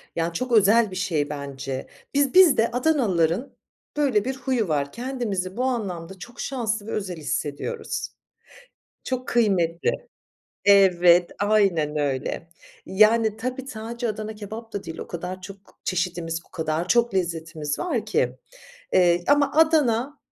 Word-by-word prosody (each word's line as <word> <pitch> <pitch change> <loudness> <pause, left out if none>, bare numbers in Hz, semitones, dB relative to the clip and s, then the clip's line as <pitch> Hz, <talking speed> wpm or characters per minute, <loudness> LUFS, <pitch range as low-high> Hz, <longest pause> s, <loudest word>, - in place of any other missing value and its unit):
Yani, 165 0 -1
çok 255 +8 -3
özel 220 -1 +5
bir - - -7
şey 170 -6 -1
bence. 135 -2 -5 0.3
Biz 280 -1 +2
biz 360 -7 +7
de 225 +2 +2
Adanalıların 240 - +1 0.4
böyle 260 -8 +2
bir 265 +1 -2
huyu 255 -5 -1
var. 140 -3 -1
Kendimizi 235 -7 -3
bu 250 - 0
anlamda 190 -8 -3
çok 240 +4 -11
şanslı 220 -5 -2
ve - - -5
özel 190 -4 -3
hissediyoruz. 155 - -3 1.0
Çok 255 -1 -3
kıymetli. 185 -8 +2 0.7
Evet, 180 -3 +5
aynen 195 -8 +2
öyle. 145 +3 -2 0.4
Yani, 215 +2 +4
tabii 255 +3 -4
sadece 235 0 -5
Adana 215 0 -4
kebap 220 +2 -8
da 200 - -5
değil, 165 - -7
o - - -6
kadar 180 +2 -6
çok 195 0 -13
çeşidimiz, 175 -2 -2
o - - -44
kadar 160 +1 -2
çok 235 +2 +3
lezzetimiz 165 -4 -2
var 250 - -2
ki, 215 - 0 0.6
eee, 175 -1 +4
ama 285 -1 +4
Adana 290 -4 +3
205 Hz, 140 wpm, -24 LUFS, 170-240 Hz, 1.0 s, biz